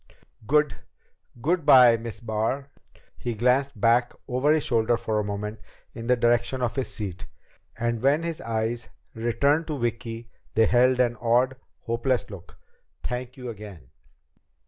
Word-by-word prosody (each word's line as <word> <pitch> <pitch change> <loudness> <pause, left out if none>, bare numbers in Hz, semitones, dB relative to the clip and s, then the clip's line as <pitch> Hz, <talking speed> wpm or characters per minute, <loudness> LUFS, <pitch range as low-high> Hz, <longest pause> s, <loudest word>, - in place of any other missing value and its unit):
"Good 150 0 +2 0.7
good 170 +3 +1
by, 125 -4 +8
Miss 115 0 -7
Barr." 115 +5 -2 0.5
He 120 -2 -3
glanced 125 +2 +1
back 120 +3 +3
over 130 +3 +1
his 155 -1 +3
shoulder 115 0 +2
for 110 -2 -1
a - - 0
moment 105 +1 -4 0.3
in 115 0 -7
the 125 - +4
direction 120 +2 +1
of 115 -1 -1
his 135 - -2
seat, 95 -4 -5 0.5
and 120 -1 -1
when 140 +5 +3
his 165 -1 -4
eyes 115 0 -2 0.2
returned 140 +7 +1
to 150 -3 -3
Vicki 115 -1 -4 0.2
they 115 - +5
held 125 +2 +3
an 120 -2 +2
odd, 125 +3 +2 0.3
hopeless 115 +1 -1
look. 95 -4 -11 0.5
"Thank 125 +2 -5
you 125 -1 -6
again." 100 - -10
120 Hz, 145 wpm, -25 LUFS, 115-130 Hz, 0.7 s, by